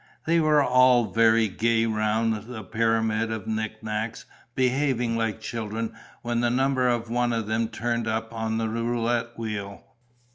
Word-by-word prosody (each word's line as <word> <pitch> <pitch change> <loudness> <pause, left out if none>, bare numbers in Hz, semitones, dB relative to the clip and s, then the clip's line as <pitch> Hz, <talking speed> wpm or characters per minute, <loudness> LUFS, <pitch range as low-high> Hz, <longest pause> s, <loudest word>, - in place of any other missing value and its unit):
They 165 +1 +3
were 155 -2 +4
all 125 -2 +4
very 115 0 +4
gay 115 +3 +1
round 110 0 0
the 115 -3 -7
pyramid 110 0 0
of 110 -3 -4
knickknacks, 110 +1 -3 0.3
behaving 130 -2 +1
like 115 -1 -1
children 110 0 -4 0.3
when 120 0 -1
the 120 0 +2
number 130 +1 +2
of 120 -1 -1
one 120 0 +1
of 115 -2 -1
them 110 +2 0
turned 115 0 -2
up 110 +1 -2
on 110 0 -2
the 115 0 0
roulette 115 +1 -1
wheel. 105 -3 -5
115 Hz, 150 wpm, -25 LUFS, 110-120 Hz, 0.3 s, were